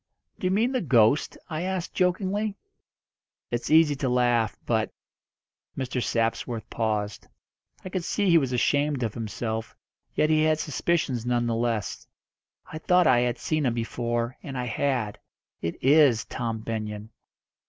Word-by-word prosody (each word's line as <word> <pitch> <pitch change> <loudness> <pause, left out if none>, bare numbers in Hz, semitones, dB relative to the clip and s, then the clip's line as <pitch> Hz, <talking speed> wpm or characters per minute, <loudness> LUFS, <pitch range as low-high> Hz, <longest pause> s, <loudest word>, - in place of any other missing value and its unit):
"Do 185 - 0
you - - +1
mean 225 +6 +2
the 255 - 0
ghost?" 125 -2 +3
I 155 -2 -3
asked 185 -1 -3
jokingly. 195 +3 0 1.0
"It's 120 0 -2
easy 155 -2 +5
to 135 -2 -1
laugh. 120 -3 +2
But - - 0 0.4
" - - -42
Mr. 130 -1 -2
Sapsworth 115 0 -1
paused. 105 -2 -2 0.6
I - - -4
could 185 -1 -3
see 200 +3 0
he 170 -2 +6
was 135 -4 -2
ashamed 140 +2 +1
of 110 -2 -2
himself, 110 0 -4 0.4
yet 155 - +2
had 155 - +4
his 155 0 +1
suspicions 150 -5 0
none 120 0 +1
the 115 - 0
less. 115 -2 -2 0.6
"I 155 - -8
thought 180 +2 +3
I 130 -6 +5
had 120 -1 0
seen 155 -1 -1
him 120 - 0
before, 120 +1 -2
and 135 -2 -6
I 125 - -2
had. 120 -3 -1 0.4
It 85 - -2
is 140 -5 +5
Tom 115 -3 -3
Benyon." 110 -1 -5
125 Hz, 155 wpm, -26 LUFS, 115-155 Hz, 1.0 s, he